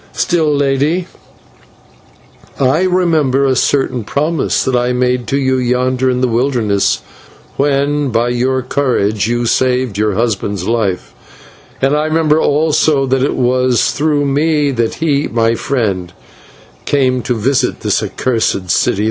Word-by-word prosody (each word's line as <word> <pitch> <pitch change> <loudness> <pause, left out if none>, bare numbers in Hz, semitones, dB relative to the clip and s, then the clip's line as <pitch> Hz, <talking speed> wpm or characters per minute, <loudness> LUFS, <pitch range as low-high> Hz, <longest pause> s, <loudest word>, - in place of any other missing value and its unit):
Still, 160 -3 +1
Lady, 145 +5 0 1.5
I 140 +7 +2
remember 160 -7 +1
a 130 -1 +2
certain 130 -2 0
promise 150 +8 -1
that 130 - 0
I 125 0 +1
made 125 -1 0
to 140 - 0
you 130 -1 +1
yonder 125 +1 0
in 125 0 -1
the 130 - +2
wilderness, 115 -4 0 0.5
when 145 0 0
by 115 +1 0
your 130 +2 0
courage 110 -7 0
you 120 +1 -1
saved 125 -3 0
your 105 -2 0
husband's 100 -4 -2
life; 100 - -2 0.7
and 135 +2 +3
I 150 +1 0
remember 155 -1 +2
also 150 -1 +2
that 135 0 0
it 140 - 0
was 125 0 +1
through 145 -1 0
me 145 +1 +1
that 115 -3 -1
he, 150 -2 0
my 115 -1 +1
friend, 100 -9 -2 0.7
came 130 -3 +1
to 125 +1 -2
visit 130 +5 0
this - - 0
accursed 110 -7 -1
city. 100 - +1
130 Hz, 140 wpm, -14 LUFS, 120-145 Hz, 1.5 s, and